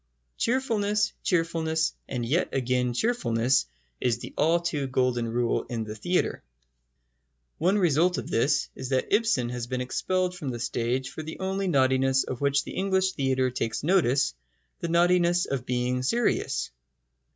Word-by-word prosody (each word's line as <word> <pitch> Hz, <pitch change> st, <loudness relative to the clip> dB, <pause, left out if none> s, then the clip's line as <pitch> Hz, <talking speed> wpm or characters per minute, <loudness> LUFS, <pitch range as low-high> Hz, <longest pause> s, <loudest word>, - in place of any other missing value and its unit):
Cheerfulness, 210 Hz, -5 st, +1 dB
cheerfulness, 165 Hz, -2 st, 0 dB, 0.2 s
and 120 Hz, -3 st, -2 dB
yet 160 Hz, +10 st, +1 dB
again 125 Hz, -2 st, 0 dB
cheerfulness, 130 Hz, -, +1 dB, 0.3 s
is 120 Hz, -2 st, +1 dB
the -, -, -9 dB
all 165 Hz, +3 st, +3 dB
too 160 Hz, -5 st, -2 dB
golden 125 Hz, -2 st, 0 dB
rule 120 Hz, +1 st, 0 dB
in 115 Hz, -2 st, -2 dB
the 105 Hz, -1 st, -6 dB
theatre. 175 Hz, +12 st, -1 dB, 1.2 s
One 185 Hz, +5 st, +3 dB
result 175 Hz, -1 st, +3 dB
of -, -, -4 dB
this 130 Hz, +6 st, +1 dB
is 130 Hz, -, -7 dB
that 130 Hz, +5 st, 0 dB
Ibsen 205 Hz, -, +2 dB
has 120 Hz, -1 st, -4 dB
been 130 Hz, 0 st, -2 dB
expelled 180 Hz, +8 st, -1 dB
from 155 Hz, -7 st, -5 dB
the 120 Hz, -2 st, -4 dB
stage 120 Hz, +3 st, -1 dB
for -, -, -6 dB
the 160 Hz, +1 st, -8 dB
only 190 Hz, +1 st, -1 dB
naughtiness 130 Hz, -3 st, +3 dB
of 130 Hz, 0 st, -6 dB
which 140 Hz, 0 st, +2 dB
the -, -, -8 dB
English 190 Hz, -1 st, +1 dB
theatre 130 Hz, -4 st, 0 dB
takes 115 Hz, -1 st, -3 dB
notice 145 Hz, -, +2 dB, 0.5 s
the -, -, -3 dB
naughtiness 175 Hz, +1 st, +3 dB
of 130 Hz, -3 st, -4 dB
being 125 Hz, 0 st, 0 dB
serious. 230 Hz, -, 0 dB
140 Hz, 150 wpm, -27 LUFS, 125-180 Hz, 1.2 s, all